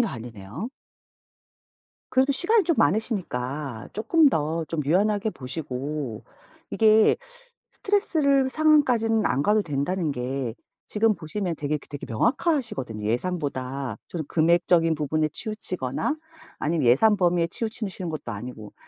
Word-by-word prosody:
갈리네요. 120 Hz, -, -4 dB, 1.4 s
그래도 265 Hz, +2 st, +3 dB
시간이 415 Hz, +9 st, +3 dB
좀 335 Hz, -3 st, +1 dB
많으시니까 145 Hz, -, -1 dB
조금 290 Hz, -, +4 dB
더 150 Hz, -, 0 dB, 0.2 s
좀 160 Hz, -2 st, -1 dB
유연하게 205 Hz, +6 st, +2 dB
보시고 135 Hz, -, -5 dB, 0.5 s
이게 220 Hz, 0 st, +5 dB, 0.6 s
스트레스를 295 Hz, -10 st, +2 dB
상황까지는 250 Hz, -8 st, +3 dB
안 125 Hz, +3 st, +1 dB
가도 210 Hz, +3 st, +3 dB
된다는 155 Hz, +1 st, -1 dB
게 125 Hz, -2 st, -3 dB, 0.3 s
지금 220 Hz, +1 st, +2 dB
보시면 175 Hz, +1 st, -3 dB
되게 150 Hz, 0 st, -2 dB
그 -, -, -17 dB
되게 145 Hz, -1 st, -7 dB
명확하시거든요. 210 Hz, -, 0 dB
예산보다 135 Hz, -, -2 dB
좀 170 Hz, -, -4 dB
금액적인 165 Hz, 0 st, +3 dB
부분에 155 Hz, +1 st, 0 dB
치우치거나 185 Hz, -, -1 dB, 0.4 s
아니면 150 Hz, -4 st, 0 dB
예산 210 Hz, -, +5 dB
범위에 175 Hz, -3 st, +2 dB
치우치시는 210 Hz, -3 st, -4 dB
것도 155 Hz, -7 st, -5 dB
아니고 110 Hz, 0 st, -8 dB
170 Hz, 310 characters per minute, -25 LUFS, 135-220 Hz, 1.4 s, 이게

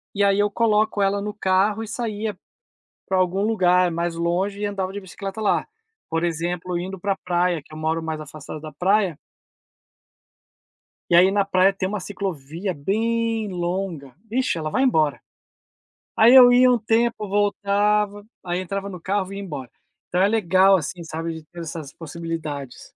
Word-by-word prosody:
e 200 Hz, -, +2 dB
aí 200 Hz, 0 st, +3 dB
eu 205 Hz, -, +3 dB
coloco 215 Hz, -1 st, +2 dB
ela 195 Hz, +1 st, +2 dB
no 210 Hz, +1 st, -4 dB
carro 200 Hz, +2 st, +1 dB
e 220 Hz, -, -7 dB
saía 220 Hz, -2 st, -3 dB, 0.7 s
pra 190 Hz, -, +1 dB
algum 185 Hz, +2 st, +1 dB
lugar 180 Hz, -4 st, +3 dB
mais 170 Hz, 0 st, -2 dB
longe 180 Hz, +4 st, -1 dB
e 210 Hz, -, -2 dB
andava 195 Hz, -2 st, -3 dB
de 205 Hz, -, -5 dB
bicicleta 195 Hz, +2 st, -7 dB
lá. 210 Hz, -, +1 dB, 0.4 s
Por 165 Hz, +1 st, -1 dB
exemplo, 175 Hz, +1 st, -2 dB
indo 190 Hz, +2 st, -5 dB
pra 195 Hz, +1 st, 0 dB
praia, 175 Hz, -1 st, +1 dB
que 155 Hz, -, -15 dB
eu 155 Hz, -, -8 dB
moro 160 Hz, +1 st, -1 dB
mais 160 Hz, -1 st, -4 dB
afastado 155 Hz, 0 st, -9 dB
da 155 Hz, 0 st, -9 dB
praia 185 Hz, 0 st, +1 dB, 1.9 s
E 170 Hz, -, +4 dB
aí 185 Hz, +2 st, +6 dB
na 200 Hz, -1 st, +2 dB
praia 190 Hz, 0 st, +4 dB
tem 190 Hz, -1 st, -2 dB
uma 205 Hz, -1 st, -3 dB
ciclovia 185 Hz, -2 st, -4 dB
bem 225 Hz, +7 st, -1 dB
longa, 175 Hz, -6 st, -3 dB, 0.2 s
vixe, 255 Hz, -5 st, 0 dB
ela 155 Hz, -1 st, -3 dB
vai 260 Hz, -, +1 dB
embora. 155 Hz, -, +2 dB, 1.0 s
Aí 235 Hz, +4 st, +7 dB
eu 245 Hz, -2 st, +9 dB
ia 250 Hz, +1 st, +6 dB
um 245 Hz, -, +3 dB
tempo, 225 Hz, 0 st, +1 dB
voltava, 205 Hz, +1 st, +1 dB, 0.2 s
aí 175 Hz, 0 st, -2 dB
entrava 195 Hz, +2 st, -4 dB
no 180 Hz, -, -8 dB
carro 190 Hz, +2 st, -1 dB
vinha 195 Hz, +1 st, -7 dB
embora. 140 Hz, -, -7 dB, 0.4 s
Então 180 Hz, -, 0 dB
é 195 Hz, -, +5 dB
legal 195 Hz, -2 st, +4 dB
assim, 175 Hz, +2 st, -5 dB
sabe, 165 Hz, +1 st, -4 dB
de 160 Hz, -, -10 dB
ter 170 Hz, +2 st, -11 dB
essas 160 Hz, -3 st, -6 dB
possibilidades. 155 Hz, -4 st, -6 dB
190 Hz, 170 wpm, -23 LUFS, 170-205 Hz, 1.9 s, eu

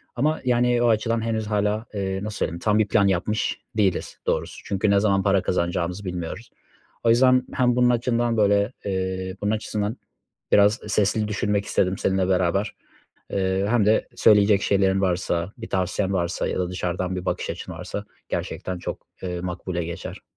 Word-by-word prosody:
ama, 150 Hz, +5 st, +1 dB
yani, 120 Hz, -1 st, +3 dB
o 120 Hz, -, +4 dB
açıdan 115 Hz, +1 st, +1 dB
henüz 110 Hz, -1 st, -2 dB
hâlâ, 105 Hz, +1 st, 0 dB
eee, 95 Hz, -1 st, -2 dB
nasıl 105 Hz, -1 st, -5 dB
söyleyeyim 85 Hz, +1 st, -2 dB
tam 105 Hz, +2 st, +2 dB
bir 105 Hz, -, +3 dB
plan 100 Hz, -1 st, +3 dB
yapmış 100 Hz, +4 st, 0 dB, 0.2 s
değiliz 95 Hz, -4 st, 0 dB
doğrusu -, -, -2 dB
çünkü 100 Hz, +1 st, 0 dB
ne 100 Hz, -, +5 dB
zaman 100 Hz, -2 st, +2 dB
para 100 Hz, -1 st, +3 dB
kazanacağımızı 90 Hz, +2 st, -1 dB
bilmiyoruz. 90 Hz, +4 st, -5 dB, 0.5 s
O 115 Hz, -, +3 dB
yüzden 130 Hz, +2 st, +5 dB
hem 125 Hz, -1 st, +2 dB
bunun 125 Hz, 0 st, +4 dB
açından, 120 Hz, -1 st, +1 dB
böyle, 100 Hz, +3 st, +3 dB
eee, 95 Hz, -1 st, -2 dB
bunun 105 Hz, +1 st, +1 dB
açısından 110 Hz, +1 st, -2 dB, 0.5 s
biraz 105 Hz, +3 st, +5 dB
sesli 105 Hz, +1 st, +1 dB
düşünmek 105 Hz, -1 st, 0 dB
istedim 95 Hz, 0 st, +1 dB
seninle 95 Hz, -1 st, +1 dB
beraber, 95 Hz, +3 st, +1 dB, 0.6 s
eee, 95 Hz, 0 st, 0 dB
hem 115 Hz, -3 st, +3 dB
de 110 Hz, -, +3 dB
söyleyecek 105 Hz, -2 st, +5 dB
şeylerin 95 Hz, -1 st, +2 dB
varsa 90 Hz, 0 st, -1 dB
bir 115 Hz, -, -8 dB
tavsiyen 95 Hz, +1 st, 0 dB
varsa 85 Hz, -1 st, -1 dB
ya -, -, -2 dB
da 90 Hz, -, -1 dB
dışarıdan 90 Hz, 0 st, -2 dB
bir 90 Hz, -, -5 dB
bakış -, -, -2 dB
açın -, -, -7 dB
varsa -, -, -6 dB, 0.2 s
gerçekten 90 Hz, -1 st, -4 dB
çok, -, -, -6 dB, 0.2 s
eee, 90 Hz, -1 st, -3 dB
makbule 90 Hz, -1 st, -3 dB
geçer. 85 Hz, 0 st, -7 dB
100 Hz, 170 wpm, -24 LUFS, 95-110 Hz, 0.6 s, ne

